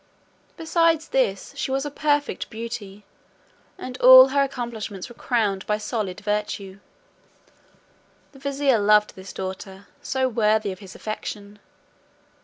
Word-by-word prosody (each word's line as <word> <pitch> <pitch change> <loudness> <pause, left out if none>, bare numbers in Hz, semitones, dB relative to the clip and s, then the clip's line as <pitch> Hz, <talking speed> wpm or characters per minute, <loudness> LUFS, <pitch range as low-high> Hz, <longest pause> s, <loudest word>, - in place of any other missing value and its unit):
Besides 330 0 +1
this, - - 0
she - - -3
was 270 +2 -1
a 290 - -4
perfect 290 0 -1
beauty, 220 -3 -7 0.7
and 255 -8 -8
all 260 +1 +10
her 280 +1 +2
accomplishments 235 -7 -4
were - - -11
crowned 210 -6 -1
by 210 - +1
solid 210 -3 -4
virtue. 205 -2 -3 1.5
The 270 - -16
vizier 275 -3 +1
loved 210 +1 +4
this 190 0 -10
daughter, 190 +1 -7 0.2
so 265 -1 0
worthy 215 -3 +1
of 185 - -9
his 190 -2 -12
affection. 210 -1 -7
220 Hz, 125 wpm, -23 LUFS, 205-270 Hz, 1.5 s, all